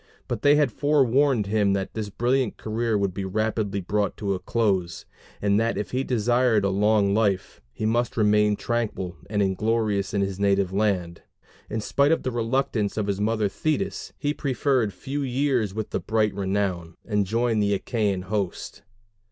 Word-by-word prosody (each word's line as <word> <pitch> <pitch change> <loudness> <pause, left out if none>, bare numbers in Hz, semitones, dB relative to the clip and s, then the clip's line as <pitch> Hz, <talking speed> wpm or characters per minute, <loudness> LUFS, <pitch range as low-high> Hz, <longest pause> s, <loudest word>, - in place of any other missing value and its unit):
But - - -3
they 145 +1 +5
had 145 -4 +2
forewarned 140 -4 +2
him 100 -1 +2
that 95 -1 -2
this 110 -2 -4
brilliant 120 +3 0
career 110 0 -1
would 100 -2 0
be 100 - -4
rapidly 105 0 -1
brought 100 +2 -1
to 100 -2 -1
a 95 - -3
close; 95 -4 -1 0.3
and 100 0 +2
that 115 +1 0
if 105 - -4
he 130 +1 0
desired 120 -3 +2
a 100 - +1
long 100 0 +3
life, 100 -3 0
he 110 - -4
must 120 +2 0
remain 105 -1 +3
tranquil 105 -6 -2
and 105 -1 +1
inglorious 105 +1 0
in 100 - 0
his 95 -1 -2
native 100 -2 +2
land. 95 -5 0 0.5
In 110 +1 -2
spite 140 +7 +2
of 165 - +1
the 130 - -1
reluctance 115 -3 -1
of 105 - 0
his 100 0 -2
mother 110 0 +1
Thetis 155 - -2
he 145 0 -1
preferred 130 -5 0
few 135 +10 -5
years 130 -5 0
with 110 +2 -5 0.2
bright 110 -1 +2
renown, 95 -4 -2
and 105 -3 0
joined 115 +1 +1
the 100 -1 +2
Achæan 100 -5 -1
host. 100 -1 -3
105 Hz, 170 wpm, -25 LUFS, 100-120 Hz, 0.5 s, they